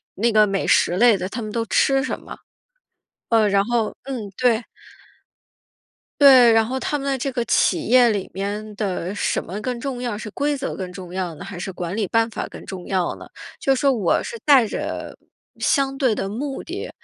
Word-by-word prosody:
那 230 Hz, +4 st, +1 dB
个 215 Hz, -1 st, +5 dB
美 195 Hz, -1 st, -2 dB
食 175 Hz, -, +3 dB
类 230 Hz, -1 st, +5 dB
的， 185 Hz, 0 st, -4 dB
他 230 Hz, -, -5 dB
们 215 Hz, -1 st, -5 dB
都 230 Hz, +1 st, -2 dB
吃 270 Hz, +6 st, +2 dB
什 -, -, -3 dB
么？ -, -, -10 dB, 0.9 s
呃， 225 Hz, -3 st, +3 dB
然 200 Hz, 0 st, +2 dB
后 230 Hz, -2 st, 0 dB
嗯， 245 Hz, -7 st, -6 dB
对。 245 Hz, -2 st, +2 dB, 1.6 s
对， 260 Hz, -5 st, +8 dB
然 225 Hz, 0 st, +4 dB
后 260 Hz, +3 st, -3 dB
他 295 Hz, -, -1 dB
们 275 Hz, -, -6 dB
的 270 Hz, -, 0 dB
这 265 Hz, +2 st, -2 dB
个 240 Hz, -1 st, -1 dB
企 -, -, +2 dB
业 245 Hz, 0 st, +6 dB
里 200 Hz, -3 st, -2 dB
面 205 Hz, +2 st, -4 dB
的 190 Hz, -3 st, -2 dB
什 205 Hz, -, -1 dB
么 190 Hz, +5 st, -6 dB
更 250 Hz, +2 st, -3 dB
重 260 Hz, -2 st, -4 dB
要， 240 Hz, -4 st, -3 dB
是 215 Hz, -, -7 dB
规 290 Hz, +7 st, -1 dB
则 270 Hz, -1 st, -4 dB
更 185 Hz, -2 st, -6 dB
重 180 Hz, -1 st, -9 dB
要 180 Hz, -3 st, -3 dB
呢？ 160 Hz, -, -9 dB
还 195 Hz, -2 st, -8 dB
是 185 Hz, -, -4 dB
管 180 Hz, +2 st, -5 dB
理 210 Hz, -3 st, 0 dB
办 230 Hz, +4 st, +1 dB
法 -, -, -5 dB
更 -, -, -11 dB
重 185 Hz, -2 st, -8 dB
要 185 Hz, -3 st, -1 dB
呢？ -, -, -11 dB, 0.3 s
就 270 Hz, -, +2 dB
说 275 Hz, +1 st, +2 dB
我 210 Hz, -9 st, +1 dB
是 465 Hz, 0 st, -7 dB
带 275 Hz, -5 st, +6 dB
着 -, -, -5 dB, 0.4 s
相 270 Hz, -1 st, +1 dB
对 255 Hz, -5 st, +2 dB
的 195 Hz, -, -3 dB
目 270 Hz, +6 st, -4 dB
的 -, -, -6 dB
225 Hz, 220 characters per minute, -22 LUFS, 195-255 Hz, 1.6 s, 对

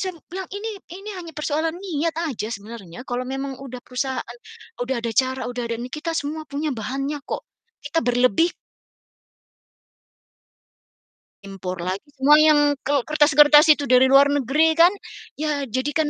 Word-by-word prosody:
Saya 375 Hz, -1 st, -2 dB
m -, -, -17 dB
bilang 375 Hz, 0 st, -5 dB
ini 410 Hz, +3 st, -5 dB, 0.3 s
ini 400 Hz, +2 st, -8 dB
hanya 335 Hz, -2 st, -9 dB
persoalan 310 Hz, +2 st, -1 dB
niat 335 Hz, -4 st, -2 dB
aja 220 Hz, -6 st, -4 dB
sebenarnya, 205 Hz, -3 st, -9 dB
kalau 250 Hz, -1 st, -3 dB
memang 270 Hz, 0 st, -4 dB
udah 255 Hz, -2 st, -8 dB
perusahaan, 260 Hz, -, -4 dB, 0.4 s
udah 260 Hz, +2 st, -2 dB
ada 230 Hz, -1 st, -3 dB
cara, 260 Hz, +3 st, +1 dB
udah 245 Hz, 0 st, -4 dB
ada 230 Hz, -, -2 dB
ini, 250 Hz, +1 st, -6 dB
kita 320 Hz, +2 st, -3 dB
semua 310 Hz, +1 st, -3 dB
punya 290 Hz, +2 st, -3 dB
bahannya 275 Hz, +5 st, -4 dB
kok. -, -, -5 dB, 0.4 s
Kita 290 Hz, +3 st, -1 dB
berlebih 245 Hz, -, +2 dB, 2.9 s
Impor 190 Hz, -2 st, -6 dB
lagi, 190 Hz, +10 st, -4 dB
semua 285 Hz, +3 st, +6 dB
yang 295 Hz, -2 st, +5 dB
kel 280 Hz, -2 st, 0 dB
kertas-kertas 295 Hz, 0 st, +6 dB
itu 295 Hz, -2 st, +5 dB
dari 255 Hz, 0 st, +5 dB
luar 275 Hz, +1 st, +7 dB
negeri 285 Hz, +3 st, +2 dB
kan, 335 Hz, +2 st, +6 dB, 0.5 s
ya 300 Hz, -1 st, -1 dB
jadikan 290 Hz, +6 st, -1 dB
285 Hz, 150 wpm, -22 LUFS, 250-310 Hz, 2.9 s, luar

